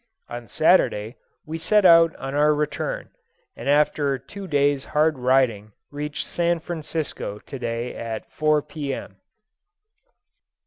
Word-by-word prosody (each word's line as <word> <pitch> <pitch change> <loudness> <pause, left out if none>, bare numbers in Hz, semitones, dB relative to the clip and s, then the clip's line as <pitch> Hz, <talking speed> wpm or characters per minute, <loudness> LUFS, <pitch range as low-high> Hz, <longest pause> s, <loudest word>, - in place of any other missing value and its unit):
On 120 -1 -7
Saturday 105 +3 +2 0.3
we 160 +1 -5
set 210 +4 +3
out 165 -2 +7
on 135 +1 -6
our 150 +1 +3
return, - - -3 0.4
and - - -5
after 145 -1 +2
two 195 - -10
days' 145 -3 +2
hard 155 -2 +3
riding 125 -5 +1 0.2
reached 150 +1 -4
San 170 0 0
Francisco 160 - -4
to 135 +5 -9
day 120 0 -3
at 115 -1 -5
4, 155 -1 +2
P.M. 140 -9 -6
145 Hz, 125 wpm, -23 LUFS, 125-160 Hz, 0.4 s, out